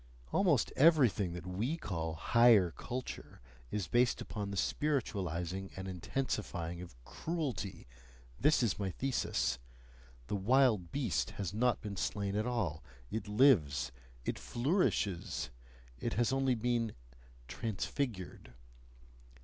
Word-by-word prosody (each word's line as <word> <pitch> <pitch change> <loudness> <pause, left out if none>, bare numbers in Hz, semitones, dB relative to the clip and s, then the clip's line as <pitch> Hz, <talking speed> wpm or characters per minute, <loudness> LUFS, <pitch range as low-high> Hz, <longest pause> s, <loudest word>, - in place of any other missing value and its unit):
Almost 170 - +3
everything 130 - +5
that 90 -2 -7
we 110 - -1
call 80 - -3
"higher 110 +1 +5
culture" 125 +1 -6 0.3
is 105 -4 -2
based 120 0 +3
upon 105 -2 -4
the 100 - -4
spiritualising 95 - -1
and 95 0 -5
intensifying 90 -3 -3
of 90 -8 -10
CRUELTY 135 - -3 0.5
this 150 -1 +4
is 110 -2 +1
my 100 -2 -1
thesis; 130 - 0 0.7
the 105 - -2
"wild 110 -3 +3
beast" 130 -9 0
has 100 -2 -3
not 120 +2 +2
been 100 -2 -5
slain 100 +1 -1
at 105 +3 0
all, 95 -11 -1 0.3
it 110 -2 -3
lives, 105 - +4 0.3
it - - -2
flourishes, 120 - 0 0.5
it - - -2
has 120 +4 +2
only 135 -1 +2
been 115 -1 0 0.5
transfigured. 100 - -4
105 Hz, 115 wpm, -34 LUFS, 90-125 Hz, 0.7 s, everything